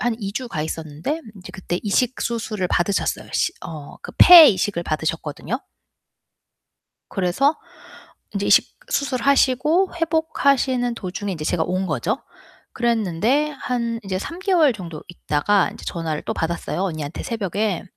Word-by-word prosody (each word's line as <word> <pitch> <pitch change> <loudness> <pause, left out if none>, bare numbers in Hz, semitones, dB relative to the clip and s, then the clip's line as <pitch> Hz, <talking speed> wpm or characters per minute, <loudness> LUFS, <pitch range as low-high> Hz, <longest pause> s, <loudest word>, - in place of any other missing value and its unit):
한 240 -2 0
2 200 -1 -4
주 255 +3 -4
가 150 - -3
있었는데 160 - -4
인제 190 -3 -11
그때 180 -1 -4
이식 240 +4 0
수술을 215 -5 -2
받으셨어요. 185 +3 0
시 - - +1 0.2
어 150 -3 -9
그 470 - -9
폐 345 -3 +11
이식을 185 -3 0
받으셨거든요. 160 - -3 1.5
그래서 200 - +1 0.8
인제 200 0 -2
이식 - - +4 0.2
수술하시고 280 - +2
회복하시는 280 -7 +1
도중에 195 0 -4
인제 155 -3 -6
제가 165 0 +1
온 185 +3 -1
거죠. 170 - -1 0.6
그랬는데 235 - +1
한 235 -2 -2
인제 190 -1 -3
3 335 - -7
개월 355 -8 +3
정도 170 -7 -8
있다가 175 +3 +1
인제 - - -12
전화를 160 -3 -3
또 - - -3
받았어요, 170 +2 -3
언니한테 155 -5 -4
새벽에 205 -3 -2
205 Hz, 305 characters per minute, -22 LUFS, 170-255 Hz, 1.5 s, 폐